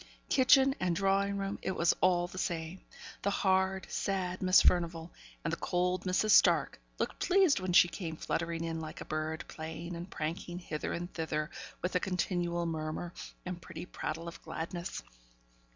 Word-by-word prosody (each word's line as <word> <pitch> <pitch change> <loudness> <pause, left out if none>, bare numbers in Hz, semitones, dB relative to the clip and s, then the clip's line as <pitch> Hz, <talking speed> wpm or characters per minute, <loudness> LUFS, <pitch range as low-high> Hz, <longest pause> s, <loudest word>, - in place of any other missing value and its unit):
Kitchen 270 0 +6
and 180 -2 +1
drawing 195 +2 +2
room, 195 0 -3
it 190 - -1
was 170 0 +3
all 175 -1 +4
the 180 +1 -7
same. 170 -1 -3 0.4
The 200 - +1
hard, 190 -1 +2
sad 185 -2 -1
Miss 185 0 +6
Furnivall, 170 -1 +2 0.3
and - - -1
the - - -1
cold 180 +1 0
Mrs. 185 +4 +2
Stark, - - +5 0.2
looked - - -2
pleased 370 - +4
when 185 -1 -2
she 175 - +7
came 170 -2 -5
fluttering 165 +1 -2
in 165 -1 -2
like 155 -1 -7
a - - -7
bird, 155 0 -3
playing 160 +2 -6
and 170 +2 -7
pranking 170 +3 -4
hither 155 -4 -4
and 175 +1 -4
thither, 155 -2 -2 0.3
with 180 - -1
a 180 - +3
continual 175 -2 -1
murmur, 160 +1 -3 0.3
and 180 -1 -5
pretty 170 - -8
prattle 165 -1 -5
of 170 - -8
gladness. 170 +2 -5
175 Hz, 170 wpm, -32 LUFS, 165-190 Hz, 0.4 s, she